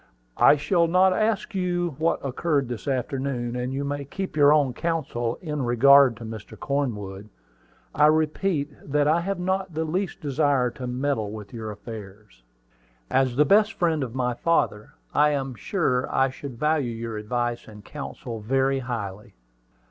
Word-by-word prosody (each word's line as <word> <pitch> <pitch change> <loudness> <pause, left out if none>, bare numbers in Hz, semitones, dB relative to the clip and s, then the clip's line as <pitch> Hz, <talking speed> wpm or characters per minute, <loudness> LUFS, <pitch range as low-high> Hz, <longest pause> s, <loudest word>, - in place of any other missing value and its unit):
"I - - +7
shall 170 +3 +2
not 185 +3 +4
even 215 - +1
ask 220 0 -1
you 175 -3 -1
what 160 -2 0
occurred 140 0 0
this 120 +1 -6
afternoon; 130 -2 -2
and 125 +1 -2
you 135 +1 -2
may 140 0 -3
keep 185 +6 -6
your 145 -1 +6
own 145 -4 +3
counsel 135 -7 -2
in 150 -3 -3
regard 130 +1 +6
to 115 - -8
Mr. 110 -2 -8
Cornwood. 105 -8 -3 0.6
I 150 +1 +5
repeat 155 0 +1
that 145 +1 +1
I 160 +3 +3
have 195 +2 -2
not 190 -1 -2
the 160 - 0
least 180 +4 -2
desire 140 -3 +1
to 125 +1 -7
meddle 125 -4 -1
with 105 -1 -9
your 110 -2 -5
affairs." 105 - -10 0.7
"As 130 -1 +2
the 150 +3 +4
best 210 +7 +4
friend 160 -4 +1
of 125 -1 -6
my 125 -1 0
father, 120 -6 0 0.2
I 150 0 +4
am 135 -2 -2
sure 125 - -1
I 135 0 +2
should 130 -2 -8
value 150 -2 +1
your 115 -1 -5
advice 120 +2 -2
and 105 -1 -13
counsel 130 -5 -7
very 135 +5 +1
highly." 105 - -6
135 Hz, 165 wpm, -25 LUFS, 120-155 Hz, 0.7 s, I